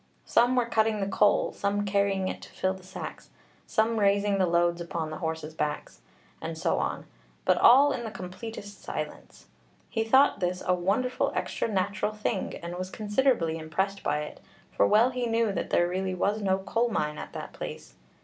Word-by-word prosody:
Some 245 +2 +3
were 245 -2 +3
cutting 220 -2 +1
the 195 - 0
coal, 205 +1 +3
some 205 +1 -1
carrying 200 -1 +1
it - - -4
to - - -11
fill 185 0 -1
the 190 - -11
sacks, 185 +1 -8 0.4
some 225 0 +1
raising 200 0 +2
the 185 - +3
loads 170 0 +2
upon 165 -2 -4
the 155 - -6
horses' 160 -2 -4
backs, 150 -1 -4 0.4
and 165 0 -5
so 160 - +1
on; - - -2 0.4
but - - +3
all 275 +4 +7
in 250 -3 -3
the 225 - -4
completest 205 +2 -8
silence. - - -6 0.5
He 225 -2 0
thought 265 +5 +4
this 180 0 -1
'a 180 - +3
wonderful 205 +8 0
extra - - -1
natural 205 +1 -1
thing,' 210 -1 -2
and 175 +1 -5
was 185 0 -4
considerably 205 -6 +1
impressed 190 +5 -2
by 150 +1 0
it, 150 - -7 0.3
for 100 - +3
well 230 - +5
he 250 -1 -2
knew 230 -1 +1
that - - -3
there 175 - +3
really 185 +1 -2
was 205 +4 0
no 190 -1 +2
coal 225 +5 0
mine 150 -8 -1
at - - -8
that - - -7
place. - - -7
200 Hz, 190 wpm, -28 LUFS, 180-225 Hz, 0.5 s, all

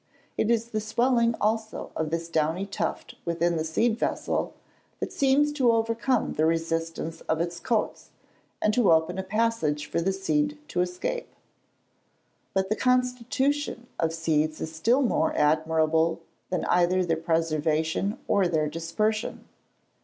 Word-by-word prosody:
It 220 - 0
is 230 0 +1
the 215 -2 -2
swelling 235 +1 +2
also 220 +1 -1
of 160 -1 -1
this 165 +1 -2
downy 165 +3 0
tuft 200 - -4
within 170 0 0
the 160 - 0
seed 220 +9 +1
vessel - - -1 0.4
that - - -4
seems 280 +2 +3
to 260 -5 +3
overcome 230 +2 +1
the 155 - +1
resistance 165 0 -2
of 160 - +1
its 170 0 -2
coats, 225 -3 -1 0.5
and 215 - +3
to 230 -5 +4
open 165 +3 +2
a - - -2
passage 190 -8 0
for 170 - -1
the 190 +3 +1
seed 295 +10 0
to 180 - 0
escape. 180 - -3 1.2
But 190 0 +1
the 215 - +1
constitution 250 +2 0
of 165 -1 +1
seeds 155 -1 0
is 160 - -5
still 240 - +3
more 195 -9 +1
admirable 160 +2 +2 0.3
than 180 - -1
either 180 +1 +3
their 165 -1 +1
preservation 160 +2 0
or 200 -3 +3
their 155 -3 +1
dispersion. 170 +8 -2
180 Hz, 145 wpm, -26 LUFS, 160-230 Hz, 1.2 s, to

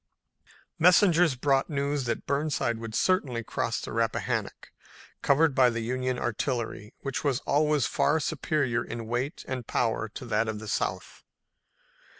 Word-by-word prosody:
Messengers 175 -3 +5
brought 135 +2 +1
news 140 -2 -1
that 120 - -2
Burnside 140 -5 0
would 115 -1 -6
certainly 135 -11 +1
cross - - -2
the - - -7
Rappahannock, - - -2 0.5
covered 145 +1 +3
by 130 -2 +5
the 115 -1 -3
Union 130 +2 -1
artillery, 120 -2 -3
which 135 -2 -3
was 135 -4 +1
always 150 -2 +2
far 160 - +2
superior 140 -5 -1
in 115 -1 -6
weight 125 +7 -3
and 125 -3 -4
power 115 -1 0
to 120 - -8
that 110 -1 0
of 110 -1 -3
the 110 +1 -8
South. - - -3
130 Hz, 145 wpm, -27 LUFS, 115-145 Hz, 0.5 s, Messengers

